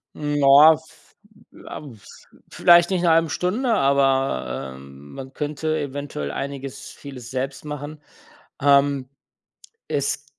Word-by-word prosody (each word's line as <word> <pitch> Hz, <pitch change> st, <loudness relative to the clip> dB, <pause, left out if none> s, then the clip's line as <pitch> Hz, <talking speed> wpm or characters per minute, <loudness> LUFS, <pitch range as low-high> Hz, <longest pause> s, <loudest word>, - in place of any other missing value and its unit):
Ja, 145 Hz, +1 st, +6 dB
v 160 Hz, +1 st, -21 dB, 0.4 s
ja, -, -, -9 dB
vs 120 Hz, -9 st, -14 dB, 0.2 s
vielleicht 175 Hz, 0 st, +5 dB
nicht 190 Hz, -2 st, 0 dB
in -, -, 0 dB
1/2 165 Hz, -1 st, +3 dB
Stunde, 225 Hz, -, -1 dB
aber, 135 Hz, -, 0 dB
ähm, 70 Hz, +1 st, -14 dB
man 135 Hz, 0 st, -9 dB
könnte 155 Hz, +2 st, -3 dB
eventuell 140 Hz, -, -5 dB
einiges 135 Hz, -, -6 dB
vieles 130 Hz, -4 st, -11 dB
selbst 135 Hz, +1 st, -4 dB
machen. 150 Hz, 0 st, -7 dB, 0.6 s
Ähm, 140 Hz, -1 st, +3 dB, 0.8 s
es 140 Hz, 0 st, -2 dB
140 Hz, 115 wpm, -22 LUFS, 135-155 Hz, 0.8 s, Ja